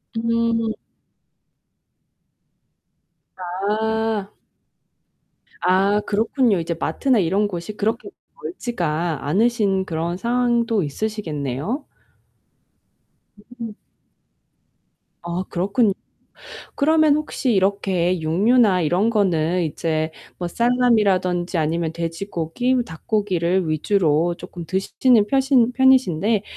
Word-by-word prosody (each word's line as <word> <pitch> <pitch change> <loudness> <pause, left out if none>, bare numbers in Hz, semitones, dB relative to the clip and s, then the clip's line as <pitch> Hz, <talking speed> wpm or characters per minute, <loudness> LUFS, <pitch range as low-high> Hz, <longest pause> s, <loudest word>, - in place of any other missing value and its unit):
음. 230 -1 0 2.6
아. 210 +3 -2 1.3
아 195 +3 +3
그렇군요. 220 0 +1
이제 165 +1 -2
마트나 235 - +1
이런 195 +4 +1
곳이 180 +1 -6
그렇게 225 - -2 0.3
멀지가 170 - -3
않으신 200 +2 +1
그런 170 +1 -3
상황도 235 -2 +1
있으시겠네요? 160 - -4 1.7
음. 225 -2 -5 1.5
아 175 +2 -3
그렇군요. 200 +5 +1 0.8
그러면 310 0 +4
혹시 300 -4 -1
이렇게 190 -2 +1
육류나 195 +4 +3
이런 180 +8 +1
거는 180 -5 +1
이제 160 0 -2 0.3
뭐 175 - -3
살라미라든지 195 -6 +1
아니면 160 +1 0
돼지고기 170 +7 -2
닭고기를 180 -1 -1
위주로 165 0 +1
조금 175 -1 -9
드시는 205 +4 +2
펴신 265 -2 +3
편이신데 225 -6 +3
195 Hz, 205 characters per minute, -21 LUFS, 170-230 Hz, 2.6 s, 그러면